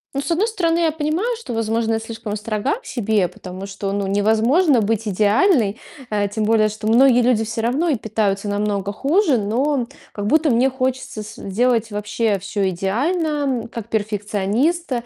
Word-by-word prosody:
Ну, 275 Hz, -, 0 dB
с -, -, -3 dB
одной 370 Hz, +7 st, +2 dB
стороны, 340 Hz, -7 st, 0 dB
я 330 Hz, -2 st, +2 dB
понимаю, 320 Hz, +10 st, -1 dB
что, 455 Hz, -, -7 dB
возможно, 225 Hz, 0 st, 0 dB
я 225 Hz, -, 0 dB
слишком 225 Hz, -2 st, -6 dB
строга 215 Hz, -, -2 dB
к -, -, -26 dB
себе, 220 Hz, -, +1 dB
потому 185 Hz, +3 st, -9 dB
что, 195 Hz, 0 st, -4 dB
ну, 200 Hz, 0 st, -1 dB
невозможно 225 Hz, -, +3 dB
быть 220 Hz, +1 st, -1 dB
идеальной, 215 Hz, -, +2 dB, 0.3 s
э, 205 Hz, -1 st, 0 dB
тем 215 Hz, +1 st, -2 dB
более, 215 Hz, 0 st, +3 dB
что 215 Hz, 0 st, -6 dB
многие 245 Hz, +2 st, +5 dB
люди 240 Hz, -2 st, +2 dB
всё 225 Hz, +1 st, -3 dB
равно 265 Hz, +9 st, 0 dB
и 295 Hz, -, +2 dB
питаются 210 Hz, -3 st, -1 dB
намного 205 Hz, -1 st, -1 dB
хуже, 290 Hz, -, +2 dB
но 245 Hz, +6 st, 0 dB, 0.3 s
как 205 Hz, -, -4 dB
будто 310 Hz, +7 st, +3 dB
мне 245 Hz, +1 st, +3 dB
хочется 260 Hz, -3 st, -3 dB
сделать 225 Hz, +2 st, -1 dB
вообще 210 Hz, 0 st, -1 dB
всё 195 Hz, +1 st, -2 dB
идеально, 240 Hz, -, -1 dB, 0.4 s
м, -, -, -8 dB
как 230 Hz, -1 st, -8 dB
перфекционист, 215 Hz, -, -1 dB
225 Hz, 170 wpm, -20 LUFS, 205-275 Hz, 0.4 s, многие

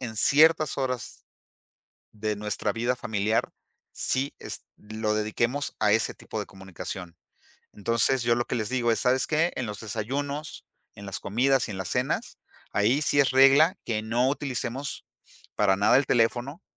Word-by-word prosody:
en 115 Hz, -4 st, -6 dB
ciertas 155 Hz, +5 st, +4 dB
horas 125 Hz, -4 st, -4 dB, 0.9 s
de 105 Hz, -1 st, -3 dB
nuestra 105 Hz, 0 st, -2 dB
vida 120 Hz, +2 st, -1 dB
familiar, 110 Hz, -2 st, -1 dB, 0.4 s
sí 135 Hz, +2 st, -1 dB
es -, -, -7 dB
lo 110 Hz, 0 st, -3 dB
dediquemos 115 Hz, +6 st, -1 dB
a 105 Hz, -1 st, +4 dB
ese 110 Hz, +1 st, +1 dB
tipo 110 Hz, -, -6 dB
de 105 Hz, -, -5 dB
comunicación. 95 Hz, -2 st, -8 dB, 0.6 s
Entonces, 115 Hz, +4 st, +1 dB
yo 120 Hz, 0 st, +3 dB
lo 120 Hz, -, 0 dB
que -, -, -3 dB
les 110 Hz, -3 st, -2 dB
digo 120 Hz, -2 st, +1 dB
es: -, -, 0 dB
"¿Sabes 130 Hz, +1 st, +2 dB
qué? 160 Hz, +3 st, +1 dB
En 125 Hz, -, -2 dB
los 105 Hz, -2 st, -6 dB
desayunos, 140 Hz, +8 st, -4 dB, 0.3 s
en 100 Hz, -, -11 dB
las 100 Hz, -, -4 dB
comidas 130 Hz, +5 st, +1 dB
y 105 Hz, -, -4 dB
en 95 Hz, -, -6 dB
las 95 Hz, -, -4 dB
cenas, -, -, -2 dB, 0.3 s
ahí 115 Hz, +9 st, +2 dB
sí 145 Hz, -, +1 dB
es 140 Hz, -, +3 dB
regla 135 Hz, +7 st, +6 dB
que 110 Hz, -2 st, -2 dB
no 120 Hz, +4 st, +1 dB
utilicemos 135 Hz, -1 st, -3 dB, 0.5 s
para 95 Hz, -2 st, +3 dB
nada 100 Hz, +5 st, +4 dB
el 140 Hz, -, 0 dB
teléfono, 120 Hz, +6 st, 0 dB
120 Hz, 165 wpm, -26 LUFS, 105-135 Hz, 0.9 s, regla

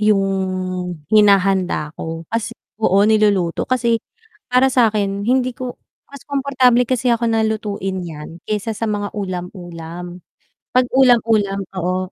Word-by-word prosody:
yung 210 Hz, -2 st, +3 dB, 0.9 s
hinahanda 195 Hz, -6 st, +3 dB
ko. 165 Hz, 0 st, -6 dB
Kas 230 Hz, -1 st, -2 dB, 0.2 s
oo, 195 Hz, -3 st, +3 dB
niluluto 205 Hz, -5 st, +2 dB
kasi 235 Hz, -3 st, +1 dB, 0.5 s
para 255 Hz, +1 st, +3 dB
sakin 210 Hz, -5 st, +2 dB
hindi 255 Hz, 0 st, +2 dB
ko 250 Hz, 0 st, -6 dB, 0.3 s
mas 280 Hz, -2 st, -12 dB
komportable 260 Hz, -4 st, +2 dB
kasi 250 Hz, -1 st, +1 dB
ako 235 Hz, 0 st, 0 dB
na 225 Hz, -1 st, +2 dB
lutuin 200 Hz, -4 st, -3 dB
yan 165 Hz, 0 st, -9 dB
kaysa 215 Hz, +1 st, -1 dB
sa 220 Hz, +1 st, -3 dB
mga 205 Hz, -1 st, -2 dB
ulam-ulam. 175 Hz, -2 st, -7 dB, 0.5 s
'Pag 255 Hz, 0 st, +3 dB
ulam-ulam 225 Hz, -6 st, +3 dB, 0.2 s
oo. 185 Hz, +1 st, -2 dB
210 Hz, 125 wpm, -19 LUFS, 185-240 Hz, 0.9 s, yung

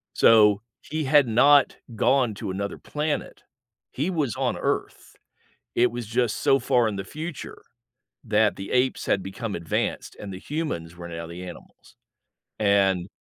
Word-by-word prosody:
So, 105 Hz, -2 st, +6 dB, 0.2 s
he 155 Hz, 0 st, -3 dB
had 145 Hz, -1 st, +4 dB
not 140 Hz, +5 st, +5 dB, 0.2 s
gone 125 Hz, 0 st, +2 dB
to 100 Hz, -, -5 dB
another 100 Hz, +2 st, -4 dB
planet. 150 Hz, 0 st, -3 dB, 0.5 s
He 145 Hz, +7 st, -2 dB
was 150 Hz, -, -1 dB
on -, -, 0 dB
Earth. -, -, -3 dB, 0.6 s
It 120 Hz, +1 st, +3 dB
was 120 Hz, -2 st, -5 dB
just 120 Hz, -1 st, 0 dB
so 135 Hz, -, +3 dB
far 125 Hz, -5 st, +2 dB
in 105 Hz, -, -2 dB
the 95 Hz, -, -4 dB
future 155 Hz, -, -7 dB, 0.6 s
that 105 Hz, 0 st, +2 dB
the 95 Hz, 0 st, -7 dB
apes 130 Hz, +1 st, +1 dB
had 100 Hz, -, +1 dB
become 100 Hz, +3 st, -5 dB
advanced 85 Hz, -1 st, -3 dB
and 100 Hz, -2 st, -7 dB
the 90 Hz, -, -7 dB
humans 95 Hz, -, -4 dB
were 85 Hz, 0 st, -8 dB
now 85 Hz, 0 st, -6 dB
the 85 Hz, +2 st, -8 dB
animals, 90 Hz, -, -12 dB, 0.6 s
and 100 Hz, -3 st, +2 dB
110 Hz, 155 wpm, -25 LUFS, 95-135 Hz, 0.6 s, So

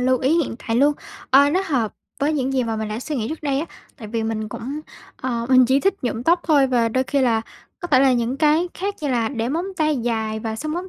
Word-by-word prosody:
lưu 255 Hz, 0 st, +2 dB
ý 265 Hz, +4 st, +1 dB
hiện -, -, -6 dB
tại 225 Hz, 0 st, 0 dB
luôn. 290 Hz, +3 st, +4 dB, 0.4 s
Ờ, 280 Hz, +2 st, +6 dB
nó 370 Hz, +5 st, +1 dB
hợp 240 Hz, -8 st, 0 dB, 0.3 s
với 295 Hz, +2 st, +2 dB
những 270 Hz, -2 st, -1 dB
gì 255 Hz, -2 st, +1 dB
mà 225 Hz, -1 st, -2 dB
mình 220 Hz, 0 st, -3 dB
đã 215 Hz, +2 st, -4 dB
suy 295 Hz, +2 st, -4 dB
nghĩ 225 Hz, -1 st, -2 dB
trước 315 Hz, 0 st, -6 dB
đây 280 Hz, -1 st, 0 dB
á, 330 Hz, -, -4 dB, 0.3 s
tại 220 Hz, -6 st, -9 dB
vì 225 Hz, 0 st, -2 dB
mình 220 Hz, -1 st, -3 dB
cũng, 275 Hz, +8 st, -5 dB, 0.4 s
ờ, 235 Hz, -2 st, -3 dB
mình 255 Hz, -1 st, +6 dB
chỉ 270 Hz, +2 st, +3 dB
thích 390 Hz, 0 st, +2 dB
nhuộm 235 Hz, -1 st, -2 dB
tóc 340 Hz, +5 st, +3 dB
thôi 285 Hz, -4 st, +4 dB
và 240 Hz, -3 st, +2 dB
đôi 260 Hz, +3 st, 0 dB
khi 280 Hz, +1 st, 0 dB
là, 230 Hz, -3 st, +2 dB, 0.4 s
có 350 Hz, -, -5 dB
thể 260 Hz, -5 st, +5 dB
là 265 Hz, -1 st, +5 dB
những 240 Hz, +2 st, 0 dB
cái 315 Hz, +3 st, +3 dB
khác 400 Hz, +2 st, -3 dB
như 295 Hz, -, -2 dB
là 235 Hz, -3 st, +1 dB
để 235 Hz, -3 st, -2 dB
móng 330 Hz, +6 st, -1 dB
tay 305 Hz, -3 st, +1 dB
dài 220 Hz, -2 st, -2 dB
và 220 Hz, 0 st, -4 dB
sơn 305 Hz, +5 st, -4 dB
móng 360 Hz, +3 st, -4 dB
260 Hz, 270 wpm, -21 LUFS, 230-300 Hz, 0.4 s, Ờ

